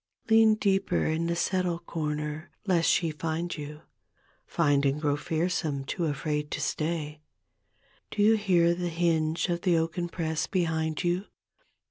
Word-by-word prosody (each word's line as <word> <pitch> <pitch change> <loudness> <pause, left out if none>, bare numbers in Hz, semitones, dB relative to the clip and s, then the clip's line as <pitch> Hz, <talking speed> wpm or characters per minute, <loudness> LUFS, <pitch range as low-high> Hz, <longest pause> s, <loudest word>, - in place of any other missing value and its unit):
Lean 220 -1 +6
deeper 195 -2 +1
in 160 +1 0
the 170 - 0
settle 180 0 0
comer 150 -1 -4 0.2
lest 175 -4 +3
she 165 -3 +2
lind 165 +2 -2
you— 150 0 -8 0.7
Find 145 -4 +2
and 140 +1 +1
grow 145 -2 +1
fearsome, 160 -2 -1
too 170 - -2
afraid 150 0 -2
to - - -2
stay: 155 -1 -2 0.9
Do 205 - 0
you 220 +2 +6
hear 180 -5 +3
the 175 0 -2
hinge 165 -1 +1
of 170 0 -1
the 175 -3 +3
oaken 170 +2 -1
press 160 -3 -2
behind 160 -4 -1
you? 175 +3 0
165 Hz, 145 wpm, -28 LUFS, 155-175 Hz, 0.9 s, Lean